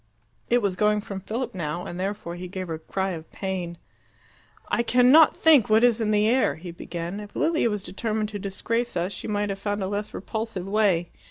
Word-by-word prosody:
It 245 Hz, -1 st, +3 dB
was 195 Hz, -2 st, +1 dB
going 210 Hz, +2 st, +2 dB
from 200 Hz, -2 st, -6 dB
Philip 230 Hz, +6 st, -4 dB
now, 170 Hz, -1 st, -3 dB
and 175 Hz, -, -6 dB
therefore 190 Hz, -2 st, -3 dB
he 180 Hz, +1 st, -6 dB
gave 185 Hz, -1 st, -6 dB
the 160 Hz, -1 st, -3 dB
cry 190 Hz, +4 st, -2 dB
of 160 Hz, -2 st, -7 dB
pain. 185 Hz, -3 st, -4 dB, 0.9 s
"I -, -, +1 dB
cannot 250 Hz, +6 st, +6 dB
think 300 Hz, -10 st, +5 dB
what 220 Hz, +2 st, +5 dB
is 240 Hz, -2 st, +4 dB
in 215 Hz, -, +1 dB
the 210 Hz, 0 st, +3 dB
air," 255 Hz, +3 st, +3 dB
he 175 Hz, +2 st, -8 dB
began. 170 Hz, +3 st, -5 dB
"If 205 Hz, -1 st, -10 dB
Lilia 320 Hz, -7 st, +2 dB
was 210 Hz, -2 st, -3 dB
determined 215 Hz, +2 st, -2 dB
to 205 Hz, -1 st, -5 dB
disgrace 225 Hz, +3 st, -2 dB
us, 180 Hz, +3 st, -1 dB
she -, -, -6 dB
might 205 Hz, -1 st, -1 dB
have 195 Hz, 0 st, -3 dB
found 205 Hz, 0 st, -2 dB
a -, -, -1 dB
less 205 Hz, +1 st, -3 dB
repulsive 220 Hz, -2 st, -4 dB
way. 195 Hz, -5 st, +2 dB
205 Hz, 205 wpm, -25 LUFS, 185-220 Hz, 0.9 s, cannot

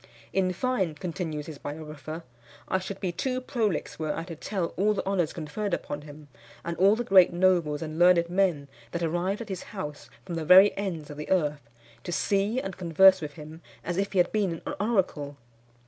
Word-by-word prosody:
"In 185 Hz, -1 st, +2 dB
fine," 190 Hz, -5 st, -1 dB
continues 160 Hz, -2 st, -4 dB
his 155 Hz, -3 st, -9 dB
biographer, 155 Hz, +1 st, -7 dB, 0.4 s
"I 190 Hz, -, +1 dB
should 190 Hz, +1 st, -6 dB
be 185 Hz, -, -2 dB
too 255 Hz, +9 st, -2 dB
prolix 225 Hz, -, -2 dB
were 155 Hz, -1 st, -1 dB
I 165 Hz, -, -3 dB
to 170 Hz, -1 st, -8 dB
tell 180 Hz, +1 st, -3 dB
all 210 Hz, +3 st, +2 dB
the -, -, -3 dB
honours 185 Hz, -5 st, 0 dB
conferred 175 Hz, +5 st, -3 dB
upon 145 Hz, -, -6 dB
him, 150 Hz, 0 st, -12 dB, 0.4 s
and 170 Hz, 0 st, -2 dB
all 195 Hz, +4 st, +5 dB
the 240 Hz, -, -2 dB
great 190 Hz, -5 st, +6 dB
nobles 175 Hz, -4 st, +2 dB
and 155 Hz, 0 st, -6 dB
learned 175 Hz, -1 st, +5 dB
men 175 Hz, -6 st, +1 dB, 0.3 s
that 170 Hz, 0 st, -2 dB
arrived 175 Hz, +6 st, -1 dB
at 225 Hz, -, -7 dB
his 190 Hz, -2 st, -4 dB, 0.2 s
house 150 Hz, -5 st, -6 dB, 0.2 s
from 180 Hz, -, -6 dB
the 165 Hz, -1 st, -2 dB
very 185 Hz, +5 st, +7 dB
ends 170 Hz, -7 st, -4 dB
of 145 Hz, -, -9 dB
the 150 Hz, -, -6 dB
earth, 150 Hz, -9 st, 0 dB, 0.3 s
to -, -, -5 dB
see 200 Hz, +6 st, +1 dB
and 195 Hz, -6 st, -6 dB
converse 185 Hz, +2 st, +5 dB
with 150 Hz, -2 st, -5 dB
him 155 Hz, +2 st, -11 dB, 0.2 s
as 175 Hz, 0 st, -3 dB
if 200 Hz, 0 st, -1 dB
he -, -, -1 dB
had 175 Hz, -1 st, +3 dB
been 195 Hz, -6 st, -1 dB
an 290 Hz, -, -3 dB
oracle. 175 Hz, -10 st, 0 dB
175 Hz, 200 wpm, -27 LUFS, 155-195 Hz, 0.4 s, very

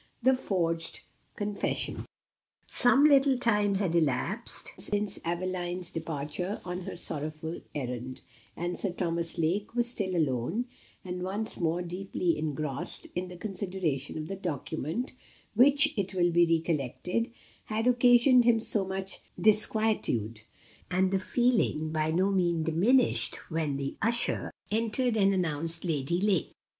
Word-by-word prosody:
The 260 Hz, +2 st, +5 dB
forged 170 Hz, -9 st, -1 dB, 0.3 s
Confession. 205 Hz, -1 st, -3 dB, 0.6 s
Some 265 Hz, +3 st, +4 dB
little 275 Hz, -3 st, +5 dB
time 210 Hz, -4 st, +2 dB
had 190 Hz, -4 st, 0 dB
elapsed 170 Hz, -, +1 dB
since 205 Hz, -1 st, 0 dB
Aveline's 175 Hz, +1 st, -3 dB
departure 160 Hz, +4 st, -4 dB
on 180 Hz, 0 st, -4 dB
her -, -, -6 dB
sorrowful 155 Hz, 0 st, -2 dB
errand, 125 Hz, -2 st, -5 dB, 0.4 s
and 175 Hz, +1 st, -3 dB
Sir 195 Hz, -4 st, -2 dB
Thomas 170 Hz, -2 st, -2 dB
Lake 190 Hz, +8 st, -1 dB
was 240 Hz, 0 st, +2 dB
still 190 Hz, -6 st, -2 dB
alone, 155 Hz, -, 0 dB, 0.4 s
and 180 Hz, 0 st, -4 dB
once 200 Hz, +4 st, -2 dB
more 170 Hz, +1 st, 0 dB
deeply 180 Hz, -1 st, -2 dB
engrossed 150 Hz, -2 st, -3 dB
in 180 Hz, +1 st, -3 dB
the 180 Hz, 0 st, -10 dB
consideration 180 Hz, -8 st, -3 dB
of 155 Hz, 0 st, -5 dB
the 195 Hz, -, -4 dB
document, 175 Hz, -, -4 dB, 0.4 s
which, 280 Hz, +6 st, +5 dB
it 195 Hz, -3 st, -2 dB
will 175 Hz, -1 st, +3 dB
be 170 Hz, 0 st, +4 dB
recollected, 165 Hz, -, -1 dB, 0.4 s
had 220 Hz, +1 st, -2 dB
occasioned 245 Hz, +1 st, +5 dB
him 235 Hz, -1 st, +4 dB
so 215 Hz, -2 st, 0 dB
much 190 Hz, 0 st, -3 dB, 0.2 s
disquietude; 215 Hz, -, +3 dB, 0.5 s
and 185 Hz, +1 st, +2 dB
the 195 Hz, -, +2 dB
feeling 215 Hz, -8 st, +1 dB
by 155 Hz, 0 st, 0 dB
no 185 Hz, +5 st, +2 dB
means 175 Hz, -4 st, +1 dB
diminished 215 Hz, +11 st, +3 dB, 0.2 s
when 155 Hz, -3 st, -1 dB
the 140 Hz, 0 st, -4 dB
usher 235 Hz, +2 st, 0 dB, 0.2 s
entered 230 Hz, +2 st, 0 dB
and 195 Hz, -2 st, +4 dB
announced 165 Hz, -2 st, -2 dB
Lady 160 Hz, +1 st, 0 dB
Lake. 195 Hz, -3 st, +1 dB
180 Hz, 130 wpm, -29 LUFS, 160-215 Hz, 0.6 s, The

